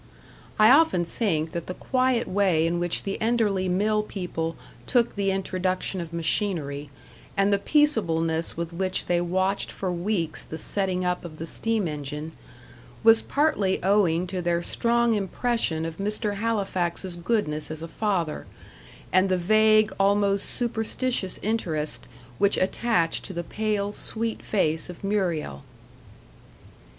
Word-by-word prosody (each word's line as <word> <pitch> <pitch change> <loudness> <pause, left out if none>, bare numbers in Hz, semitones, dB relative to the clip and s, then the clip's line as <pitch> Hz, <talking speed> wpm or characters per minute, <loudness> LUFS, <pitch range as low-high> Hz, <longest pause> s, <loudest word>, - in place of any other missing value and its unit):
I 215 +1 +7
often 275 - +5
think 165 -4 -1
that 170 0 -5
the 180 - -5
quiet 255 -2 +1
way 185 -4 +2
in 170 +1 0
which 175 -1 -1
the 195 - -3
Enderley 215 -5 +1
mill 210 +4 +2
people 175 -5 -4 0.3
took 240 -3 +2
the 200 -1 0
introduction 185 -1 -1
of 170 -1 -7
machinery, 160 -4 -1 0.5
and 195 +1 +3
the 200 - +2
peaceableness 170 - +2
with 170 0 -4
which 185 +2 -1
they 175 -1 +1
watched 190 +3 0
for 185 -2 -3
weeks 175 -3 -2
the 160 - -7
setting 185 0 -1
up 180 0 -1
of 160 -3 -9
the 165 - -5
steam 220 +4 -1
engine, 150 +1 -5 0.7
was 225 0 +7
partly 280 -11 +1
owing 185 -3 +3
to 185 0 -4
their 170 0 0
strong 235 +2 +2
impression 205 -5 0
of 165 -1 -5
Mr. 210 +1 -1
Halifax's 190 -5 -1
goodness 170 -5 -1
as 155 0 -6
a - - -5
father, 175 -5 -2 0.7
and 185 +1 +4
the 185 - +2
vague, 215 +3 +4
almost 200 0 +2
superstitious 235 -3 -2
interest 165 -9 -2 0.3
which 200 0 +3
attached 185 -3 +1
to 190 - -6
the 170 0 -3
pale, 210 +1 -1
sweet 225 +2 -2
face 165 -5 0
of 180 +2 -10
Muriel. 175 - -1
190 Hz, 140 wpm, -25 LUFS, 170-215 Hz, 0.7 s, I